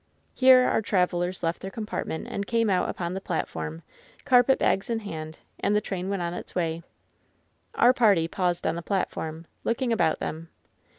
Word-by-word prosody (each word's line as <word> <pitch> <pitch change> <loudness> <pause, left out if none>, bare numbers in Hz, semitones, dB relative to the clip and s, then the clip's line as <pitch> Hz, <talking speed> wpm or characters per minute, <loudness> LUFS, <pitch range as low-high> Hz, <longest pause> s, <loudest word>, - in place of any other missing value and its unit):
Here 255 -1 +7
our 235 - +2
travelers 180 -3 0
left 165 +1 -1
their 190 - -5
compartment 210 -5 -4
and 200 0 -4
came 230 -3 +2
out 180 -1 +1
upon 175 0 -3
th^ 190 +1 -5
platform, 80 0 -4 0.4
carpetbags 245 -5 +3
in 230 - 0
hand; 160 -5 -7 0.2
and 205 - +1
the - - +4
train 190 -2 -4
went 195 -3 -1
on 170 0 -2
its - - -8
Way. 165 -2 -1 0.9
Our 245 - +5
party 205 -10 +4
paused 175 0 -1
on - - +1
th^ 170 - -5
platform, 165 -4 -3 0.2
looking 235 +1 0
about 160 -8 +2
them. 165 +1 -5
185 Hz, 170 wpm, -26 LUFS, 165-220 Hz, 0.9 s, Here